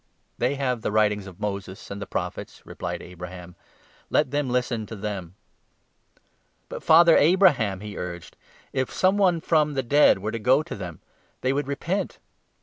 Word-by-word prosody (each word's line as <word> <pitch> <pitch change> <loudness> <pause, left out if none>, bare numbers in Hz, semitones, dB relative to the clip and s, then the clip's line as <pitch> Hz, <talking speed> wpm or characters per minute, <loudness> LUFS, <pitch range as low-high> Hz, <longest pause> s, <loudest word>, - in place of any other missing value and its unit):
' - - -45
They 125 +4 +1
have 125 -4 -1
the - - -2
writings 105 -2 +1
of 95 -3 -12
Moses 100 -2 -5
and 100 +1 -6
the 100 - -5
Prophets,' - - -5
replied - - -5
29 - - -11
Abraham; 90 0 -9 0.3
' - - -31
let 130 - +2
them 145 -2 0
listen 120 -3 -1
to 110 - -7
them.' 95 -4 -5 1.3
'But, - - -6
Father 165 +1 +7
Abraham,' 145 - +4
he 105 -1 -7
urged, 90 -1 -7 0.4
'if 130 -1 -1
some 190 +1 +2
one 185 -4 +3
from 150 -3 +2
the 135 - 0
30 - - -18
dead 145 -6 +6
were 105 +3 -4
to 115 - -4
go 130 +7 +3
to 170 - -7
them, 90 -6 -8 0.4
they 130 +1 +1
would 145 0 -2
repent.' 170 +8 -2
115 Hz, 185 wpm, -25 LUFS, 100-145 Hz, 1.3 s, Father